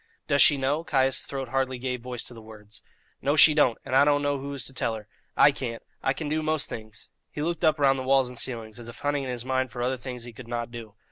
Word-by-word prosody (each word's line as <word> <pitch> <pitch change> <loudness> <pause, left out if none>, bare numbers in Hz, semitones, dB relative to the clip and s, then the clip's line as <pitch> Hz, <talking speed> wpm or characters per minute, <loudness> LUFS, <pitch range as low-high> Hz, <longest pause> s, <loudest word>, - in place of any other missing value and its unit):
"Does 140 -1 +3
she 145 - +7
know?" 140 +4 0
Caius' 135 -4 +1
throat 135 -2 -4
hardly 130 0 0
gave 125 0 -3
voice 125 -1 -4
to - - -7
the 115 - -11
words. 105 -1 -9 0.4
"No, 145 +2 +1
she 155 +1 +8
don't; 130 -6 +3
and 130 - -2
I 135 - +7
don't 145 0 +3
know 145 -1 0
who 140 +1 -6
is 130 - -2
to 135 - -7
tell 115 -3 -1
her. 105 -1 -9 0.3
I 145 - +7
can't. 120 -4 -5 0.2
I 135 - +1
can 150 +3 -4
do 155 +1 0
most 155 -1 0
things." 110 -2 -9 0.2
He 150 - -4
looked 170 +1 -2
up 155 0 +4
round 135 -2 +3
the - - -3
walls 135 0 +3
and 125 -1 -5
ceiling, 115 -4 -3
as 115 +2 -10
if 120 - -10
hunting 145 0 -1
in 135 - -4
his 120 -1 -5
mind 130 0 0
for 120 +1 -4
other 130 +1 0
things 125 -1 -7
he 120 0 -10
could 120 +1 -11
not 120 0 -3
do. 115 -4 -9
130 Hz, 275 wpm, -26 LUFS, 120-140 Hz, 0.4 s, she